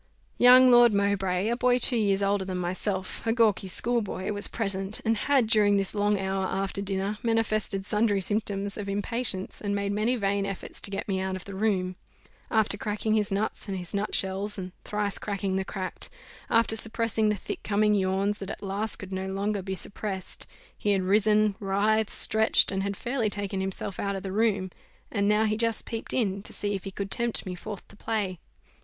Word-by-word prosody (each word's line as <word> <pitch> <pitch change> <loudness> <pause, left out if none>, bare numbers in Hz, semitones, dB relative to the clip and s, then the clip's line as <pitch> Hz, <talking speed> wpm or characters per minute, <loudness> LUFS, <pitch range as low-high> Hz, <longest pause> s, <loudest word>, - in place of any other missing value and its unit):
Young 250 +1 +8
Lord 240 -3 +7
Mowbray, 195 -1 +1
a 235 - +1
boy 250 0 +3
two 250 0 +5
years 200 -3 +2
older 200 0 +1
than 185 -1 -4
myself, 185 +2 -2
a - - +4
gawkee 220 -4 +2
schoolboy, 210 -1 +1
was 205 0 -2
present; 195 -2 -2
and 225 0 +3
had, 265 +3 +2
during 210 -2 +4
this 195 -1 0
long 205 -1 +1
hour 190 0 -1
after 195 +1 -2
dinner, 200 +1 -2
manifested 215 -4 0
sundry 210 -1 +2
symptoms 200 0 -1
of 200 -1 -4
impatience, 205 -1 -1
and 200 -1 -1
made 200 0 -1
many 215 +5 +1
vain 200 -3 0
efforts 195 -1 -5
to - - -1
get 195 0 -4
me 190 -2 0
out 190 0 -2
of 185 - -8
the 200 - -8
room. 190 -3 0 0.5
After 215 -2 +2
cracking 215 +1 -1
his 210 -2 +1
nuts 205 +3 -2
and 195 -1 -3
his 180 -2 -7
nut 200 +1 -1
shells, 195 +2 0
and 185 -1 -5
thrice 210 -1 +1
cracking 195 -2 -2
the 190 - 0
cracked 190 0 -5 0.4
after 230 -1 +3
suppressing 225 0 0
the 210 - +1
thick 200 - -6
coming 210 +1 +2
yawns 195 +1 +1
that 195 - -6
at - - -7
last 200 +2 -3
could 190 -1 -10
no 190 0 -3
longer 200 +1 -1
be 190 0 -4
suppressed, 195 -1 -5 0.3
he 205 - +1
had 190 -1 +1
risen, 210 +2 +3
writhed, 210 +2 +1
stretched, 220 +1 +3
and 195 -1 -1
had 200 0 -3
fairly 240 -3 -1
taken 200 -1 -3
himself 190 0 -4
out 200 0 -1
of 195 - -5
the 190 - -4
room. 200 -3 +1 0.4
And 200 -2 +1
now 210 +1 +3
he 215 0 +1
just 230 -1 -1
peeped 225 -1 -5
in, 200 -5 0
to - - -7
see 205 0 -1
if 195 -1 -4
he - - -3
could 195 0 -5
tempt 235 -2 0
me 185 - -4
forth 200 +2 -8
to - - -15
play. 200 -5 -2
200 Hz, 200 wpm, -27 LUFS, 195-215 Hz, 0.5 s, Young